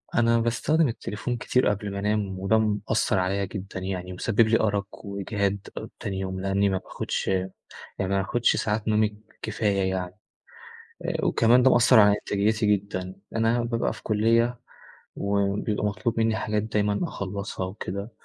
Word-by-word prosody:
أنا 115 0 +4
باستخدم 145 +7 +2
التليفون 120 +1 -4
كتير 125 +1 +1
قبل 105 0 -1
ما 100 - -4
أنام 100 -2 -1
وده 95 +3 +3
مأثر 105 -1 +1
عليَّ 95 +2 0
جدًا 95 -2 -6
يعني، 90 -1 -4
مسبب 110 +4 +1
لي 115 +1 +3
أرق 100 -1 -2
وإجهاد 100 0 -2
آآ، - - -5
تاني 95 -1 -3
يوم، 95 -1 -3
لأني 100 +1 +2
ما 95 - 0
باخدش - - -4
يعني 95 -1 +1 0.5
ما 100 0 0
باخدش 115 +4 +2
ساعات 105 0 -1
نومي 105 -1 +2 0.2
كفاية 100 -3 0
يعني، 90 -1 -3 0.9
آآ - - -1
وكمان 120 +2 +4
ده 130 - +6
مأثر 120 0 +6
على 105 0 +6
إنتاجيتي 105 +2 0
جدًا. 95 -1 -6 0.2
أنا 115 +1 +2
بابقى 115 -1 -1
في - - -13
كلية 115 +2 +2 0.5
وبيبقى 100 +1 0
مطلوب 115 +3 -1
منّي 110 0 +2
حاجات 105 -1 -1
دايمًا 105 -1 0
أخلصها 100 - -4
وكده 100 +2 -5
105 Hz, 155 wpm, -26 LUFS, 100-115 Hz, 0.9 s, ده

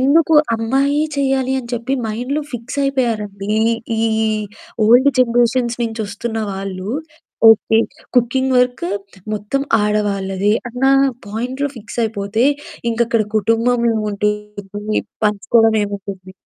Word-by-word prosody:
ఎందుకు 315 +4 +4 0.2
అమ్మాయే 275 +6 +1
చేయాలి 265 -1 +1
అని 240 -2 -7
చెప్పి 240 +3 -3 0.2
మైండ్‌లో 250 +7 -2
ఫిక్స్ 245 +4 -5
అయిపోయారండి. 210 -7 -1 0.5
ఈ - - +1 0.2
ఈ - - +1 0.6
ఓల్డ్ 245 +5 +6
జనరేషన్స్ 240 0 +2
నుంచి 225 -1 -3
వస్తున్న 220 +3 -5 0.2
వాళ్ళు, 195 0 -5 0.6
ఓకే. 225 0 +5 0.4
కుకింగ్ 260 +2 +2
వర్కు 250 -8 +1 0.4
మొత్తం 210 +6 -2 0.2
ఆడవాళ్ళదే 205 -1 0 0.2
అన్న 250 +3 -3 0.4
పాయింట్‌లో 250 +7 -3
ఫిక్స్ 215 +1 -9
అయిపోతే 220 +2 -1 0.5
ఇంకక్కడ 230 -1 +1
కుటుంబం 230 +3 +2
ఏముంటుంది? 210 -1 -2 0.2
పంచుకోవడం 220 +2 +3
ఏముంటుంది? 195 -2 -6
225 Hz, 105 wpm, -18 LUFS, 210-250 Hz, 0.6 s, ఓల్డ్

